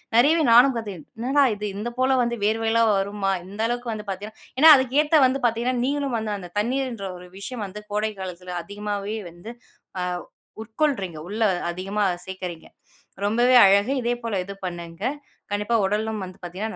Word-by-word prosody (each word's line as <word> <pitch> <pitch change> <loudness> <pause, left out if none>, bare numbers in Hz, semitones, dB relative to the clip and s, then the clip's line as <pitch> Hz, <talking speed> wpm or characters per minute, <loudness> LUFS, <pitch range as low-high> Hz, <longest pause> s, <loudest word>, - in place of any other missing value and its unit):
நிறையவே 305 +7 +5
நானும் 245 +3 +7
கத்து 225 -3 -4 0.3
என்னடா! 265 +5 +2
இது 210 +1 -5
இந்த 215 +4 -3
போல 260 +1 +3
வந்து 235 0 0
வியர்வையெல்லாம் 225 +1 +2
வருமா! 195 0 -1
இந்த 205 +3 -7
அளவுக்கு 240 0 -3
வந்து 215 -1 -5
பார்த்தீங்கன்னா, 205 +3 -6 0.2
ஏன்னா, 315 +3 +8
அதுக்கு 260 +1 0
ஏத்த 305 0 +4
வந்து 260 +2 +1
பார்த்தீங்கன்னா, 240 +2 +1
நீங்களும் 280 -2 -1
வந்து 220 -1 -3
அந்த 180 -2 -8
தண்ணீர்ன்ற 235 -2 -1
ஒரு 180 0 -12
விஷயம் 225 +3 -5
வந்து 205 +2 -8
கோடை 215 +1 0
காலத்தில 180 -1 -6
அதிகமாவே 205 +2 -4
வந்து 175 +7 -10 0.5
அ - - 0 0.6
உட்கொள்றீங்க. 220 - -1
உள்ளே 215 +1 +1 0.2
அதிகமா 195 +4 -2 0.2
சேர்க்கிறீங்க. 180 -3 -7 0.6
ரொம்பவே 240 +4 +3
அழகு. 200 +6 +4
இதே 240 +1 +1
போல 210 -4 -1
இது 200 - -8
பண்ணுங்க. 170 0 -7 0.5
கண்டிப்பா 210 +3 +1
உடலும் 210 0 -1
வந்து 185 +1 -12
பார்த்தீங்கன்னா, 190 +6 -5
215 Hz, 160 wpm, -24 LUFS, 195-240 Hz, 0.6 s, ஏன்னா